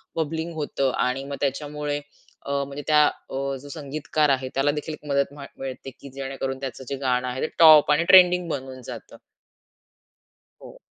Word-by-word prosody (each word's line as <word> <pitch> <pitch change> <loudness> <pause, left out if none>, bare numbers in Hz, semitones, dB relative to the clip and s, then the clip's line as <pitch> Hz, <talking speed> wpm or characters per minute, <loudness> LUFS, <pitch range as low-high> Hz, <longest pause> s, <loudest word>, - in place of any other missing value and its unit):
Bubbling 160 +1 -3
होतं 140 -3 -1 0.2
आणि 130 +2 -2
मग 140 0 -5
त्याच्यामुळे 145 +1 -2 0.5
अ, - - -7 0.2
म्हणजे 140 +1 -7
त्या 150 -1 +6
अ, 135 0 -4
जो 145 - -12
संगीतकार 150 0 -1
आहे, 130 -1 0
त्याला 135 +2 +2
देखील 150 +1 -5
एक 150 - -12
मदत 140 0 +1
म 145 -1 -10
मिळते, 135 0 -6
की 140 - -11
जेणेकरून 135 -1 -4
त्याचं 130 -1 -6
जे 140 - -2
गाणं 125 -2 0
आहे, 125 +1 -4
ते - - 0
टॉप 155 -3 +8
आणि 150 +3 +3
ट्रेंडिंग 180 -1 +7
बनून 130 -3 -5
जातं. - - -9 1.5
हो. - - -13
140 Hz, 170 wpm, -24 LUFS, 135-150 Hz, 1.5 s, टॉप